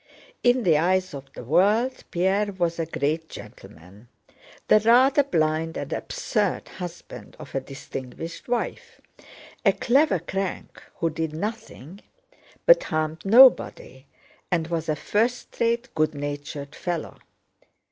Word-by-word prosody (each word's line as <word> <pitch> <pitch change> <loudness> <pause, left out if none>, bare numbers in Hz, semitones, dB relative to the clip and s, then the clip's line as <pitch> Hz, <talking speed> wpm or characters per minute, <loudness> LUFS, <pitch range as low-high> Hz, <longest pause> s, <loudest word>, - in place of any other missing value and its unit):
In 245 0 +3
the 160 -6 +4
eyes 185 +2 +1
of 135 -1 -9
the - - -9
world 205 - +2
Pierre 195 +4 +1
was 170 -2 -1
a 165 - -1
great 160 +1 -2
gentleman, 95 +8 -13 0.6
the 215 - +6
rather 255 +6 +5
blind 160 - 0
and - - -4
absurd 205 -5 -2
husband 175 -2 -9
of 150 -3 -11
a 135 - -1
distinguished 135 +3 -8
wife, 245 -1 -3 0.6
a 200 - +5
clever 255 +1 +3
crank 190 +3 -5
who 165 -1 -1
did 160 0 -3
nothing 205 - -6 0.6
but - - +6
harmed 155 0 -2
nobody 200 - +5 0.4
and 165 -2 0
was 165 -1 -2
a 155 - +1
first 230 - -1
rate, 235 +2 0
good 155 -1 0
natured 145 0 -6
fellow. 175 -3 -4
170 Hz, 125 wpm, -24 LUFS, 155-220 Hz, 0.6 s, the